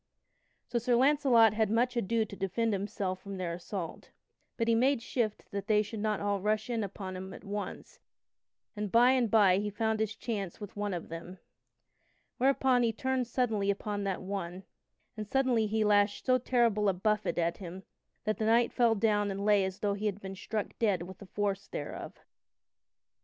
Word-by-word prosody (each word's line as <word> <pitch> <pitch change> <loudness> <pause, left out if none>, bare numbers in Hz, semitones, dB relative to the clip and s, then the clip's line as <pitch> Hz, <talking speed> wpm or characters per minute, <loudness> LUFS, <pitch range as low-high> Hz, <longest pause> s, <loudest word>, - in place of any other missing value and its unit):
So 240 - -1
Sir 240 +1 +2
Launcelot 255 -4 +5
had 215 -1 +1
much 245 +3 +1
ado 230 0 +1
to 200 - -10
defend 215 +4 -1
himself 195 -1 -3
from 200 -1 -7
their 175 -2 -3
assault. 175 0 -6 0.5
But 230 - 0
he 230 - +4
made 255 +3 +3
shift 230 -4 -2
that 200 0 -4
they 210 -1 +4
should 215 +1 -7
not 210 -1 0
all 200 -1 -1
rush 215 +3 0
in 230 -2 0
upon 195 -1 -6
him 190 +1 -7
at - - -12
once, 200 -1 -6 0.8
and 210 -2 -3
by 240 +2 +6
and 250 -4 +2
by 195 -4 +5
he 210 +1 -2
found 220 +1 -1
his 220 -1 -1
chance 205 -6 -4
with 205 -2 -8
one 205 -2 -2
of 170 - -6
them. 170 +3 -8 1.0
Whereupon 265 -1 +3
he 230 -1 +2
turned 260 +2 -1
suddenly 225 -5 0
upon 205 0 -2
that 195 -1 -2
one, 185 -1 -5 0.5
and 215 -1 -5
suddenly 250 -3 +2
he 220 +1 +1
lashed 205 -1 +2
so 255 -1 +4
terrible 230 -5 +2
a - - +2
buffet 210 +3 0
at 170 0 0
him 185 0 -8 0.4
that 215 0 -1
the 220 - 0
knight 235 +1 +3
fell 235 -2 +3
down 205 -1 +2
and 200 +1 -3
lay 205 -2 +4
as 190 0 -4
though 205 -1 +1
he 205 +2 -2
had 200 -1 -2
been 195 -1 -7
struck 210 +1 -3
dead 200 -7 +2
with 185 +1 -10
the 200 - -11
force 200 0 -2
thereof. - - -6
210 Hz, 190 wpm, -31 LUFS, 195-230 Hz, 1.0 s, by